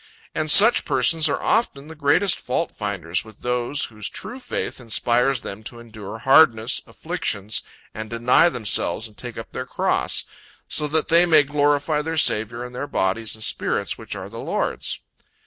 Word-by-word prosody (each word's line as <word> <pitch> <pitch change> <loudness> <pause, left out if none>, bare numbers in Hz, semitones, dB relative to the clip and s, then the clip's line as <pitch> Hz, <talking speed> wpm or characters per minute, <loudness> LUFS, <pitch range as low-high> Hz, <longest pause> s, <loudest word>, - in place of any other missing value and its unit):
And 155 0 -2
such 220 +9 +8
persons 155 +4 +2
are 140 - -1
often 150 -11 0
the 160 - -9
greatest 160 +6 +1
fault 165 - -2
finders 95 -5 -3
with 110 -2 -16
those, 125 +3 -1
whose 105 -2 -7
true 245 +4 -7
faith 250 - -4
inspires 120 +2 +1
them 100 +2 -8
to 120 +1 -9
endure 110 -3 -9
hardness, 120 -2 +4
afflictions 115 - -3 0.3
and 110 0 -7
deny 120 +8 +3
themselves 110 - 0
and 105 - -19
take - - -9
up - - -8
their - - -6
cross, - - 0 0.4
so 150 - 0
that 155 +1 0
they 170 +2 +5
may 155 -3 +6
glorify 145 +1 +1
their 160 +1 -4
Saviour 115 -3 +1
in 125 - -10
their 140 +4 -5
bodies 110 -3 -1
and 110 - -7
spirits - - -1
which - - -7
are - - -7
the - - -9
Lord's. - - -2
125 Hz, 170 wpm, -22 LUFS, 110-155 Hz, 0.4 s, such